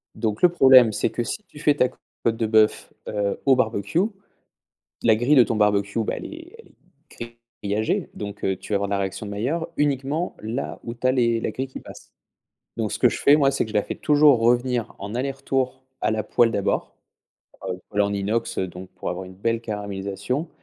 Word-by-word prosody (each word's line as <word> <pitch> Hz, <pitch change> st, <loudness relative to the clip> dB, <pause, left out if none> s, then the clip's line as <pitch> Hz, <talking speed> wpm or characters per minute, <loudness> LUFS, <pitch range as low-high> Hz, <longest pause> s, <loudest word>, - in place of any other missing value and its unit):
Donc 110 Hz, -3 st, -2 dB
le 180 Hz, -, +7 dB
problème 130 Hz, -8 st, +7 dB
c'est -, -, 0 dB
que 120 Hz, -, -3 dB
si 215 Hz, -, -4 dB
tu -, -, -16 dB
fais 150 Hz, 0 st, +3 dB
ta 125 Hz, -, +3 dB
côte 115 Hz, -, -4 dB
de 115 Hz, -, 0 dB
bœuf, 110 Hz, 0 st, +2 dB, 0.2 s
heu, 100 Hz, -1 st, -1 dB
au 135 Hz, -1 st, +6 dB
barbecue, 120 Hz, -, 0 dB, 1.0 s
la 110 Hz, -2 st, +5 dB
grille 120 Hz, +7 st, +3 dB
de 130 Hz, -, +8 dB
ton 115 Hz, 0 st, -1 dB
barbecue 100 Hz, 0 st, +1 dB
bah -, -, -2 dB
elle -, -, -7 dB
est 335 Hz, +4 st, -11 dB
elle 455 Hz, -, -16 dB, 0.6 s
est 120 Hz, 0 st, -20 dB, 0.3 s
grillagée, 105 Hz, +2 st, 0 dB
donc 105 Hz, -1 st, -7 dB
heu, 95 Hz, -, +1 dB
tu 105 Hz, -, -9 dB
vas -, -, +4 dB
avoir 100 Hz, 0 st, -1 dB
la 100 Hz, -, 0 dB
réaction 95 Hz, +2 st, -3 dB
de -, -, -6 dB
Mailleur 140 Hz, +11 st, -2 dB
uniquement 145 Hz, +3 st, -1 dB
là 115 Hz, +5 st, -4 dB
où 115 Hz, -, -5 dB
tu 120 Hz, -, -17 dB
as -, -, +5 dB
les 115 Hz, -3 st, +2 dB
la -, -, -2 dB
grille 130 Hz, -, -4 dB
qui 130 Hz, -, -9 dB
passe. -, -, -13 dB, 0.7 s
Donc -, -, -1 dB
ce -, -, -3 dB
que -, -, +5 dB
je -, -, -4 dB
fais 145 Hz, -, +6 dB
moi, 140 Hz, -2 st, +4 dB
c'est 135 Hz, -, 0 dB
que -, -, -10 dB
je -, -, -12 dB
la 105 Hz, -, +3 dB
fais -, -, -5 dB
toujours 145 Hz, -4 st, +4 dB
revenir 120 Hz, 0 st, +1 dB
en 100 Hz, +3 st, -6 dB
aller-retour 135 Hz, 0 st, -2 dB, 0.2 s
à -, -, +1 dB
la 110 Hz, 0 st, 0 dB
poêle 115 Hz, +2 st, +3 dB
d'abord, 100 Hz, -3 st, -1 dB, 0.7 s
heu, 90 Hz, -1 st, -4 dB
poêle 105 Hz, 0 st, +1 dB
en 100 Hz, 0 st, 0 dB
inox 105 Hz, +4 st, -2 dB
donc 95 Hz, 0 st, -5 dB
pour 90 Hz, -1 st, -6 dB
avoir 90 Hz, +2 st, -5 dB
une 95 Hz, 0 st, -12 dB
belle 115 Hz, +4 st, -1 dB
caramélisation 100 Hz, -, -4 dB
115 Hz, 215 wpm, -23 LUFS, 100-130 Hz, 1.0 s, de